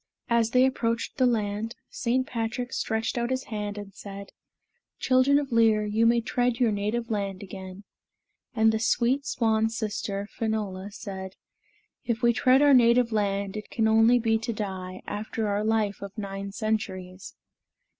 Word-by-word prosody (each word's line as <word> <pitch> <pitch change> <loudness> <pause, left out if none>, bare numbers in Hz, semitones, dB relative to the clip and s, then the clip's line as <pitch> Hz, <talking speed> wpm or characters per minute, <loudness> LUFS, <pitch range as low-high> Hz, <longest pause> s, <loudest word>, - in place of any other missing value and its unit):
As 230 -1 +3
they 255 +2 +4
approached 230 -3 -1
the 255 - +4
land, 220 -1 -1 0.2
St. 255 +2 0
Patrick 240 +1 -3
stretched 220 +2 -1
his 255 +2 -1
hand 210 -1 -5
and 205 -1 -8
said, 200 0 -9 0.7
"Children 260 +2 +4
of 285 -2 -2
Lir, 225 -2 +4
you 220 +2 +2
may 235 0 +3
tread 245 +1 0
your 240 -3 +3
native 215 +3 -2
land 200 -2 -2
again." 190 0 -9 0.7
And 220 -1 +4
the 220 - -1
sweet 255 +5 +1
swan 225 -4 +1
sister, 205 -3 -3
Finola, 205 -4 -3
said, 190 -2 -7 0.7
"If 235 0 -2
we 235 0 +5
tread 255 +4 +4
our 290 -1 +6
native 240 -1 +5
land, 200 -2 -1
it 210 -1 -6
can 220 -1 +1
only 225 +2 +5
be 225 -2 +1
to 225 +1 -3
die, 190 -4 -5
after 215 +1 -3
our 205 +1 0
life 215 -2 0
of 200 +1 -8
nine 200 -1 -5
centuries. 195 -4 -4
220 Hz, 155 wpm, -26 LUFS, 200-235 Hz, 0.7 s, our